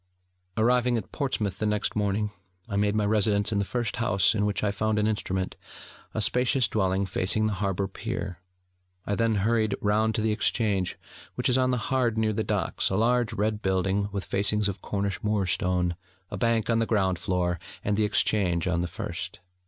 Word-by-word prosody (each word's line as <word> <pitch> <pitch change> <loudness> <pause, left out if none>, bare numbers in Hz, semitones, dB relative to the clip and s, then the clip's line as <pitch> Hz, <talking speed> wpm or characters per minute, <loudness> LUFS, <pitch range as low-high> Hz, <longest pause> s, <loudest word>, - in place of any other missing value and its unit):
Arriving 120 +2 +3
at 115 - -6
Portsmouth 115 -9 -2
the 110 - 0
next 105 0 0
morning, 105 0 0 0.4
I 100 - -4
made 105 +1 +2
my 105 -1 +2
residence 105 0 +2
in 100 - +1
the - - +2
first 120 +2 -2
house 105 -4 +3
in 105 -1 +1
which 105 - -2
I 105 - +2
found 110 +1 0
an 105 - +2
instrument, 95 -3 -1 0.6
a 110 - 0
spacious 125 +3 +2
dwelling 95 -1 +1
facing 95 +3 0
the 110 - +1
Harbour 100 0 -1
Pier. 100 -3 -5 0.7
I 100 - -1
then 115 +1 +2
hurried 110 -3 +2
round 110 +2 +1
to 110 - 0
the 110 0 +1
Exchange, 105 -4 0 0.4
which - - 0
is 125 - +3
on 130 0 +2
the 125 - +1
Hard 125 -4 +2
near 110 -1 +1
the 110 - -1
Docks, - - 0
a 95 - -1
large 120 +1 +2
red 105 +1 -1
building 95 +2 0
with 100 -1 -3
facings 105 +1 +1
of 95 -2 -4
Cornish 100 -1 -2
moor 105 -2 +1
stone, 90 -1 0 0.4
a - - -3
bank 115 +1 +1
on 115 - +3
the 115 - +1
ground 95 -5 +1
floor, 90 -1 0 0.2
and 105 - +1
the 110 - +2
Exchange 95 -4 +2
on 85 -2 +1
the 90 - -1
first. - - -6
105 Hz, 195 wpm, -27 LUFS, 95-110 Hz, 0.7 s, Arriving